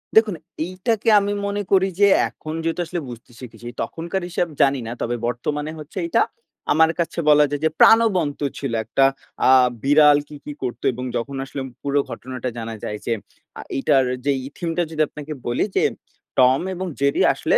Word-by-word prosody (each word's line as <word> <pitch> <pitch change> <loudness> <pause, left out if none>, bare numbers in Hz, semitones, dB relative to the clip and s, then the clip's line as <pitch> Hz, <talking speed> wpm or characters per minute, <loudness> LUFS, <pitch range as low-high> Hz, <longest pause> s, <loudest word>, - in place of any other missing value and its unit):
দেখুন, 220 -4 +5 0.3
এইটাকে 200 +5 -1
আমি 200 0 -1
মনে 200 0 -1
করি 190 0 +4
যে 200 - +7 0.2
এখন 155 0 -8
যেহেতু 165 +2 -1
আসলে 175 +1 -4
বুঝতে 120 0 -11
শিখেছি। 120 -2 -10
তখনকার 170 +3 -3
হিসাব 175 0 0
জানি 135 -1 +3
না। - - -4
তবে 120 +1 -1
বর্তমানে 145 +6 -3
হচ্ছে 150 +5 -11
এইটা, 170 - +2 0.5
আমার 160 +2 +5
কাছে 170 - -1
বলা 150 0 +7
যায় 145 0 -3
যে - - +4
প্রাণবন্ত 190 -10 +5 0.2
ছিল 135 -4 -3
একটা 135 +5 +3 0.4
আ - - +6 0.3
বিড়াল 145 +1 +6
কি, 150 - -11
কি, 150 - -5
করত 125 -2 -4
এবং 125 +2 -5
যখন 140 +4 -4
আসলে 135 0 -6 0.2
পুরো 140 0 +1
ঘটনাটা 130 -1 -5
জানা 115 -1 -5
যায় 105 - -3
যে, 115 - +1 0.5
আ - - -5 0.2
এইটার 135 -1 +3 0.2
যেই 140 -2 +2
ই - - -8
থিম 170 - -3
টা 175 - +3
যদি 155 -1 -1
আপনাকে 150 +1 -7
বলি 120 - +1
যে, - - +3 0.6
টম 130 +1 +5 0.2
এবং 185 +1 -4
জেরি 140 0 +2
আসলে - - +2
145 Hz, 185 wpm, -22 LUFS, 130-175 Hz, 0.6 s, যে